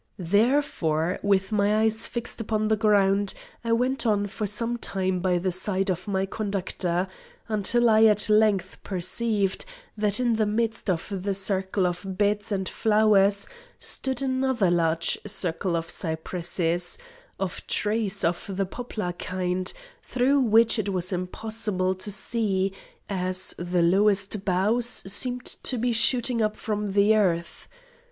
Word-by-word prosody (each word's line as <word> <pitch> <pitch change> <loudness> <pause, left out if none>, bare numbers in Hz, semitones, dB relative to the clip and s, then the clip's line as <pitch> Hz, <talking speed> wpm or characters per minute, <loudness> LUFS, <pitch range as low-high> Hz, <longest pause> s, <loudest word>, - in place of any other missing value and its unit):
Therefore, 185 - +1
with 195 0 +1
my 210 +1 +2
eyes 220 +1 +1
fixed 235 -1 -5
upon 215 -1 0
the 220 - +4
ground, 200 -2 +2 0.3
I 230 - -1
went 250 +4 +1
on 210 -3 +2
for 210 +1 -4
some 230 +4 -2
time 190 -4 -2
by 180 0 +1
the 185 +1 -1
side 190 +1 -1
of 185 +2 -4
my 195 -1 0
conductor, 190 -3 -2 0.4
until 225 +3 +2
I 220 0 +6
at 210 -1 +4
length 210 -3 +2
perceived, 195 +2 -1 0.3
that 210 0 0
in 240 -3 +2
the 215 -1 +2
midst 225 0 -1
of 175 -1 -1
the 200 +1 -1
circle 190 0 0
of 185 +2 -3
beds 205 +1 +1
and 190 -2 -1
flowers, 210 -2 +3 0.3
stood 265 0 -2
another 260 -7 +1
large 165 -1 +1
circle 180 -2 -1
of 165 0 -2
cypresses, 170 +1 -2 0.4
or 195 - 0 0.2
trees 210 -2 -1
of 180 +3 -1
the 195 - +1
poplar 215 -3 -4
kind, 185 0 -2 0.3
through 260 +3 +2
which 225 -2 +4
it 205 -1 -1
was 185 -1 -1
impossible 185 +1 -2
to 185 +2 -7
see, 195 -2 0 0.3
as 185 -1 0
the 175 0 +1
lowest 200 +2 +2
boughs 215 +6 +1
seemed 250 +2 -3 0.2
to 255 - -2
be 240 +1 +1
shooting 240 +1 +2
up 215 0 0
from 210 -2 -3
the 205 +2 +5
earth. 170 -5 0
200 Hz, 145 wpm, -26 LUFS, 185-220 Hz, 0.4 s, I